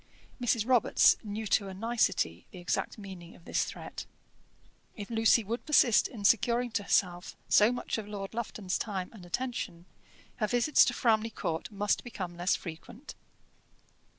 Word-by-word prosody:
Mrs. 235 Hz, -2 st, +1 dB
Robarts 250 Hz, -3 st, +5 dB
knew 215 Hz, +1 st, -5 dB
to 200 Hz, -1 st, +1 dB
a 190 Hz, -, -7 dB
nicety 215 Hz, -, 0 dB
the -, -, -12 dB
exact 175 Hz, -1 st, -2 dB
meaning 190 Hz, -4 st, -10 dB
of 170 Hz, -, -19 dB
this -, -, 0 dB
threat. -, -, -8 dB, 0.9 s
If 205 Hz, 0 st, -8 dB
Lucy 225 Hz, 0 st, +4 dB
would 230 Hz, +4 st, -4 dB
persist 260 Hz, -7 st, +4 dB
in 210 Hz, -5 st, -8 dB
securing 240 Hz, +2 st, +3 dB
to 220 Hz, -, -1 dB
herself 180 Hz, -3 st, 0 dB
so 210 Hz, +3 st, +5 dB
much 245 Hz, -2 st, -3 dB
of 210 Hz, -, -7 dB
Lord 200 Hz, -1 st, -6 dB
Lufton's 215 Hz, -4 st, -3 dB
time 190 Hz, -4 st, -4 dB
and 185 Hz, -6 st, -12 dB
attention, 205 Hz, -5 st, -4 dB, 0.5 s
her 215 Hz, -, 0 dB
visits 245 Hz, +6 st, +4 dB
to 245 Hz, -, -1 dB
Framley 225 Hz, -1 st, +2 dB
Court 165 Hz, -6 st, -4 dB
must 205 Hz, 0 st, 0 dB
become 185 Hz, -7 st, -6 dB
less 175 Hz, +2 st, +1 dB
frequent. 180 Hz, -, -9 dB
210 Hz, 155 wpm, -30 LUFS, 185-235 Hz, 0.9 s, Robarts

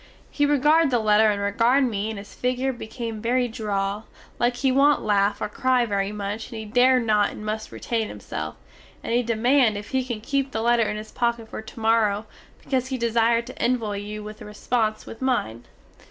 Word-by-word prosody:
He 290 Hz, -1 st, +2 dB
regard 295 Hz, +2 st, +4 dB
the 245 Hz, -, +2 dB
letter 215 Hz, -1 st, +4 dB
and 205 Hz, -1 st, 0 dB
regard 230 Hz, +7 st, +2 dB
me 215 Hz, -4 st, -1 dB
and 220 Hz, -, -5 dB
his 200 Hz, +1 st, -10 dB
figure 255 Hz, +1 st, -1 dB
become 230 Hz, -2 st, -6 dB
very 245 Hz, +2 st, +1 dB
droll, 210 Hz, -2 st, -3 dB, 0.3 s
like 240 Hz, +1 st, +2 dB
he 265 Hz, +1 st, +1 dB
want 280 Hz, +3 st, +4 dB
laugh 200 Hz, 0 st, +2 dB
or -, -, 0 dB
cry 255 Hz, +2 st, +1 dB
very 200 Hz, -2 st, -1 dB
much 210 Hz, +1 st, -4 dB
and 230 Hz, -, -7 dB
he 220 Hz, -, -6 dB
dare 250 Hz, +4 st, +4 dB
not 215 Hz, -3 st, +2 dB
and 215 Hz, -, -9 dB
must 215 Hz, +1 st, -4 dB
retain 225 Hz, -2 st, -2 dB
himself, 80 Hz, -6 st, -6 dB, 0.5 s
and -, -, -2 dB
he 240 Hz, -, +3 dB
demand 235 Hz, 0 st, +2 dB
if 205 Hz, -, -8 dB
he 260 Hz, -1 st, 0 dB
can 240 Hz, -3 st, -4 dB
keep 275 Hz, +4 st, -1 dB
the 220 Hz, -, -1 dB
letter 235 Hz, -1 st, +3 dB
in 210 Hz, -, -3 dB
his 215 Hz, 0 st, -8 dB
pocket 235 Hz, -2 st, -1 dB
for -, -, -6 dB
tomorrow, 220 Hz, -1 st, +1 dB, 0.4 s
because 260 Hz, -2 st, -1 dB
he 260 Hz, -1 st, -3 dB
desire 230 Hz, 0 st, +2 dB
to 255 Hz, +2 st, -10 dB
envoy 230 Hz, -5 st, 0 dB
you 210 Hz, +1 st, -6 dB
a 215 Hz, -, -6 dB
response 215 Hz, +1 st, -2 dB
with 225 Hz, -, -10 dB
mine. 120 Hz, -, -1 dB
225 Hz, 195 wpm, -24 LUFS, 210-250 Hz, 0.5 s, regard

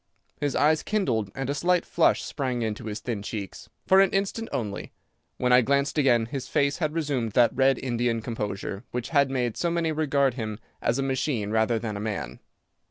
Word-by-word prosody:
His 145 Hz, -2 st, -1 dB
eyes 155 Hz, +2 st, +3 dB
kindled 125 Hz, -, 0 dB
and 135 Hz, 0 st, -3 dB
a 140 Hz, -, 0 dB
slight 175 Hz, +4 st, +1 dB
flush 170 Hz, -, +2 dB
sprang 130 Hz, -4 st, -2 dB
into 110 Hz, -1 st, -3 dB
his 105 Hz, 0 st, -5 dB
thin 115 Hz, -5 st, -3 dB
cheeks. 100 Hz, -2 st, -6 dB, 0.2 s
For 190 Hz, -, +6 dB
an 195 Hz, -, +4 dB
instant 200 Hz, +4 st, -1 dB
only. 105 Hz, -5 st, -4 dB, 0.4 s
When 125 Hz, 0 st, +2 dB
I 125 Hz, -, +7 dB
glanced 140 Hz, +3 st, +1 dB
again 120 Hz, -5 st, +4 dB
his 130 Hz, +2 st, -5 dB
face 140 Hz, +3 st, +1 dB
had 155 Hz, -2 st, -1 dB
resumed 140 Hz, -9 st, -1 dB
that 120 Hz, -1 st, +4 dB
red 135 Hz, 0 st, +4 dB
Indian 120 Hz, -2 st, -1 dB
composure 105 Hz, -2 st, -4 dB
which 125 Hz, 0 st, -4 dB
had 140 Hz, -3 st, +3 dB
made 125 Hz, -4 st, -1 dB
so 170 Hz, -, 0 dB
many 170 Hz, -1 st, 0 dB
regard 140 Hz, -4 st, +1 dB
him 110 Hz, -4 st, -4 dB, 0.2 s
as 115 Hz, -, +1 dB
a 135 Hz, -, 0 dB
machine 130 Hz, -5 st, -1 dB
rather 110 Hz, +1 st, +2 dB
than 110 Hz, -2 st, -4 dB
a -, -, -4 dB
man. 105 Hz, -2 st, -4 dB
130 Hz, 195 wpm, -26 LUFS, 115-145 Hz, 0.4 s, I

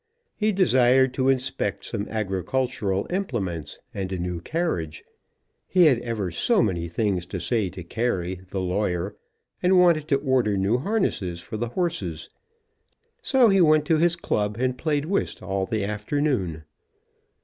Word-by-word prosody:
He 215 Hz, 0 st, +1 dB
desired 130 Hz, -8 st, +4 dB
to 130 Hz, 0 st, +1 dB
inspect 135 Hz, 0 st, -1 dB
some 100 Hz, -, -4 dB
agricultural 100 Hz, 0 st, -1 dB
implements, 100 Hz, -, -3 dB, 0.2 s
and 95 Hz, -1 st, -4 dB
a 95 Hz, -, -2 dB
new 90 Hz, -1 st, -3 dB
carriage, 90 Hz, -, -2 dB, 0.6 s
he 180 Hz, -2 st, +5 dB
had 135 Hz, -7 st, +5 dB
ever 110 Hz, -7 st, -3 dB
so 210 Hz, -, +2 dB
many 85 Hz, -4 st, -1 dB
things 90 Hz, -1 st, -1 dB
to -, -, -4 dB
say 110 Hz, -6 st, 0 dB
to 90 Hz, -, -8 dB
Carey, 95 Hz, -3 st, -2 dB
the 95 Hz, -, -3 dB
lawyer, 90 Hz, 0 st, -1 dB, 0.5 s
and 185 Hz, +1 st, +4 dB
wanted 170 Hz, -4 st, +4 dB
to 145 Hz, -, +3 dB
order 130 Hz, -7 st, +1 dB
new 100 Hz, +6 st, +1 dB
harnesses 135 Hz, -, -1 dB
for 95 Hz, -, -8 dB
the 120 Hz, +1 st, -2 dB
horses. 115 Hz, -, -3 dB, 0.9 s
So 260 Hz, -4 st, +4 dB
he 195 Hz, -1 st, +4 dB
went 155 Hz, -2 st, +5 dB
to 160 Hz, 0 st, +2 dB
his 170 Hz, +1 st, +3 dB
club, 105 Hz, -10 st, -1 dB
and 130 Hz, 0 st, +1 dB
played 150 Hz, +1 st, -1 dB
whist 195 Hz, -, -2 dB
all 95 Hz, 0 st, -2 dB
the 110 Hz, -3 st, -1 dB
afternoon. 105 Hz, -, -1 dB
115 Hz, 150 wpm, -25 LUFS, 95-155 Hz, 0.9 s, he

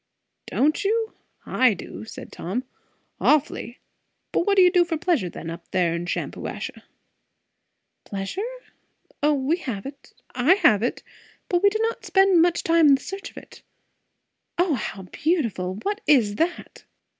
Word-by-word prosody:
"Don't 305 Hz, +7 st, +1 dB
you! 445 Hz, +2 st, 0 dB, 0.3 s
I 250 Hz, -5 st, +3 dB
do," 190 Hz, -, -9 dB
said -, -, -10 dB
Tom. 215 Hz, +9 st, -4 dB, 0.6 s
"Awfully. 275 Hz, -5 st, +1 dB, 0.5 s
But 345 Hz, -, 0 dB
what 400 Hz, -, +4 dB
do 380 Hz, -, +7 dB
you 360 Hz, -, +6 dB
do 355 Hz, -1 st, +5 dB
for 335 Hz, -2 st, -2 dB
pleasure 310 Hz, -, 0 dB
then, 165 Hz, 0 st, -7 dB
up 170 Hz, +1 st, -10 dB
there 175 Hz, -3 st, +1 dB
in 170 Hz, +1 st, -3 dB
Shampuashuh?" -, -, -4 dB, 1.2 s
"Pleasure? 375 Hz, -, -4 dB, 0.6 s
O, 295 Hz, 0 st, +3 dB
we 280 Hz, +5 st, 0 dB
have 235 Hz, -, -5 dB
it 275 Hz, 0 st, -11 dB, 0.2 s
I 260 Hz, +9 st, +4 dB
have 215 Hz, -, +4 dB
it 240 Hz, -, -2 dB, 0.5 s
But 350 Hz, -1 st, +2 dB
we 405 Hz, -, +6 dB
do 425 Hz, -, -2 dB
not 455 Hz, 0 st, -2 dB
spend 385 Hz, -3 st, +4 dB
much 345 Hz, 0 st, +2 dB
time 330 Hz, -1 st, +4 dB
in 280 Hz, -, +7 dB
the 270 Hz, -, -6 dB
search 390 Hz, +1 st, -6 dB
of -, -, -20 dB
it. -, -, -12 dB, 1.0 s
O 350 Hz, -2 st, +2 dB
how 210 Hz, -5 st, -4 dB
beautiful! 215 Hz, -, -1 dB
what 410 Hz, +2 st, -2 dB
is 220 Hz, -8 st, +4 dB
that?" 340 Hz, +5 st, -2 dB
300 Hz, 155 wpm, -24 LUFS, 215-365 Hz, 1.2 s, do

